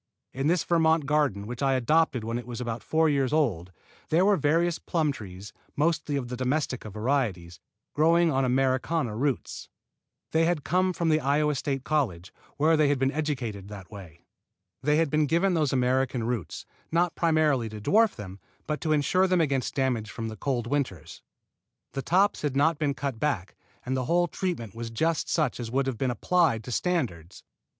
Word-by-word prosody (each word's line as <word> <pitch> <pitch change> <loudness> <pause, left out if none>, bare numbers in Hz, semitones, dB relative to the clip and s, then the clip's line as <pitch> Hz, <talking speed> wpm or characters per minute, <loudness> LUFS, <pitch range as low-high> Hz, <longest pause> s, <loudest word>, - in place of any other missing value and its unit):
In 135 +3 -1
this 175 0 +2
Vermont 160 -2 +2
garden 140 -9 +1
which 120 +2 -7
I 135 -1 +2
adopted 130 -1 +2
when 115 +2 -2
it 120 - -10
was 120 -1 -6
about 120 -2 -4
four 160 0 +2
years 140 -4 +1
old, 100 - 0 0.4
there 170 +4 +3
were 205 0 +5
various 165 +2 +1
plum 160 -4 0
trees, 100 -5 -9 0.2
mostly 155 -1 0
of 135 -3 -2
domestica 125 -1 -2
varieties, 105 -7 -2 0.3
growing 165 +2 +4
on 135 -1 +1
Americana 130 0 0
roots. 135 0 -2 0.6
They 160 +1 +3
had 165 -4 0
come 185 +2 +1
from 170 -2 -1
the 155 0 +3
Iowa 150 +1 +1
State 135 -1 -2
College, 115 - -1 0.2
where 160 +3 +4
they 155 -1 +3
had 145 0 +2
been 135 +1 +1
educated 125 -11 -3
that 100 -3 -10
way. 90 -5 -12 0.6
They 150 +2 +2
had 160 -3 +1
been 150 -1 +2
given 170 +6 +2
those 155 -5 +1
Americana 130 -1 +1
roots, 115 -7 -4 0.3
not 170 +1 +2
primarily 155 -8 +2
to 110 0 -8
dwarf 215 - +3
them, 100 -2 -9 0.3
but 150 -1 -3
to 155 -2 +1
insure 185 +6 +2
them 185 -1 +2
against 140 -5 0
damage 125 -6 0
from 115 0 -5
the 110 - -7
cold 120 +1 -2
winters. 130 - -3 0.7
The 135 - -3
tops 190 +8 +2
had 145 -3 -2
not 150 +3 +2
been 145 -3 0
cut 140 -6 -4
back, 115 -11 -2 0.3
and 130 +1 -1
the 130 -1 -1
whole 175 +4 +2
treatment 165 - -4
was 115 0 -6
just 160 +8 -1
such 150 -8 0
as 120 -2 -4
would 135 +3 0
have 130 -5 -3
been 130 - 0
applied 125 -1 +1
to 125 - -7
standards. 115 - -2
140 Hz, 185 wpm, -27 LUFS, 115-160 Hz, 0.7 s, were